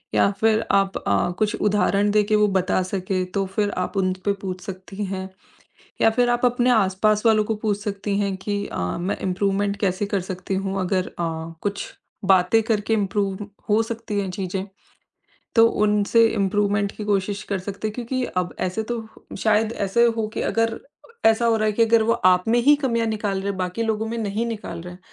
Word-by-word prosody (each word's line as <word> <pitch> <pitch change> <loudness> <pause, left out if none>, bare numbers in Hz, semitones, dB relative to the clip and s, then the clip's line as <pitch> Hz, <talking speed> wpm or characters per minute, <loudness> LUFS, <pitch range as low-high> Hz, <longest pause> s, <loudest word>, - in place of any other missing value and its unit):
या - - +4
फ़िर 220 0 +3
आप 195 -1 +2
अ, 100 - 0
कुछ 215 0 +1
उदाहरण 205 0 +2
देके 210 0 +3
वो 210 0 +4
बता 185 0 +1
सकें 185 0 -2
तो 195 +1 0
फ़िर 205 +2 -1
आप 185 +2 -2
उनपे 185 +1 0
पूछ 185 -2 -5
सकती 195 +1 -6
हैं। 190 0 -5 0.7
या 225 - +6
फ़िर 245 +2 +2
आप 240 +1 +1
अपने 245 +1 +2
आसपास 210 0 +2
वालों 215 -1 +4
को 220 - -1
पूछ 210 -2 0
सकती 200 -1 -2
हैं 200 -1 -1
कि 205 +1 -3
अ, - - -6 0.2
मैं 180 +3 -2
इम्प्रूवमेंट 200 +2 0
कैसे 195 0 0
कर 200 -1 -1
सकती 185 +1 -4
हूँ? 195 0 -2
अगर 185 0 0
अ, 170 - -5 0.4
कुछ 205 0 -3 0.3
बातें 190 +3 +4
करके 220 0 0
इम्प्रूव 200 -2 -1 0.3
हो 215 +2 +4
सकती 225 -2 -4
हैं 195 -2 -3
चीज़ें, 190 0 -3 0.9
तो 225 -1 +7 0.2
उनसे 210 +2 +4
इम्प्रूवमेंट 205 -1 0
की 215 - -4
कोशिश 200 0 -1
कर 195 - 0
सकते 200 +3 -5
हैं। 215 - -5
क्योंकि 250 +1 -2 0.2
अब 175 - -6
ऐसे 185 +4 -1
तो 230 -2 -3 0.3
शायद 215 0 +2
ऐसे 200 +3 +1
हो 220 -1 0
कि - - -2
अगर 225 0 0 0.5
ऐसा 225 +1 +4
हो 230 -1 +4
रहा 215 - 0
है - - +2
कि 230 - +3
अगर 225 0 +4
वो 230 +1 +3
आप 180 0 +5
में 235 +2 +3
ही 290 +3 +7
कमियाँ 230 -3 +1
निकाल 210 -3 -1
रहे 195 - -4
हैं, 195 - -3
बाकी 185 +5 -2
लोगों 220 0 -1
में 230 - -3
नहीं 215 +1 -2
निकाल 210 -7 -5
रहे 180 +1 -8
हैं। 180 - -14
205 Hz, 200 wpm, -23 LUFS, 190-220 Hz, 0.9 s, तो